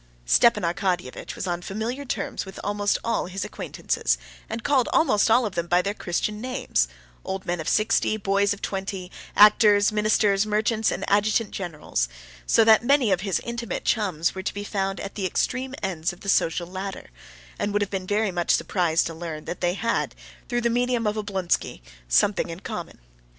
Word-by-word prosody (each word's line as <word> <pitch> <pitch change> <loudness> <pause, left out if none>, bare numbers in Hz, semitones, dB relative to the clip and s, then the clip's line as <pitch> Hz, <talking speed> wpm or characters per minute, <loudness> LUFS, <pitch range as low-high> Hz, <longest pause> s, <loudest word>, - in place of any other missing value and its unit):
Stepan 210 - +4
Arkadyevitch 175 -4 -2
was - - -4
on 175 -1 -2
familiar 225 +9 -4
terms - - -3
with 190 -1 -10
almost 205 0 +1
all 230 -5 0
his 190 +2 -4
acquaintances, - - -1 0.3
and 225 +1 -4
called 275 -4 +2
almost 230 -10 +3
all 240 +2 +5
of 205 - -3
them 170 -1 -2
by 175 +1 +4
their 200 +3 -1
Christian 210 +3 -2
names: 250 - 0 0.4
old 190 0 -4
men 175 -1 -2
of 155 -1 -2
sixty, 215 0 +2
boys 200 0 +1
of 205 - -4
twenty, 190 -1 -4 0.2
actors, 210 -1 +6
ministers, 210 -1 +3
merchants, 215 +1 +1
and - - -3
adjutant 210 +2 +2
generals, 155 - -3 0.4
so 225 - +5
that 220 0 +6
many 260 -4 +3
of 185 -1 +2
his 195 -2 0
intimate 235 -4 -4
chums 185 -7 +1
were 190 - -5
to - - -3
be 205 - -4
found 195 -2 -2
at 200 - -6
the 195 -3 -2
extreme 260 +7 -1
ends 175 -4 -1
of 175 - -14
the 195 - -4
social 175 -2 +2
ladder, 190 +2 -6 0.5
and 205 - -1
would 205 0 +1
have 200 - -6
been 190 -2 -3
very 210 0 +1
much 175 -1 -3
surprised 170 -3 +2
to 165 - -4
learn 160 -2 -6
that - - -6
they 175 0 +1
had, 230 +3 -1 0.3
through 240 -1 0
the 235 - +2
medium 245 -1 +1
of 210 0 +1
Oblonsky, 195 - -2 0.3
something 190 - +3
in 165 +2 -7
common. - - -6
200 Hz, 185 wpm, -25 LUFS, 180-220 Hz, 0.5 s, actors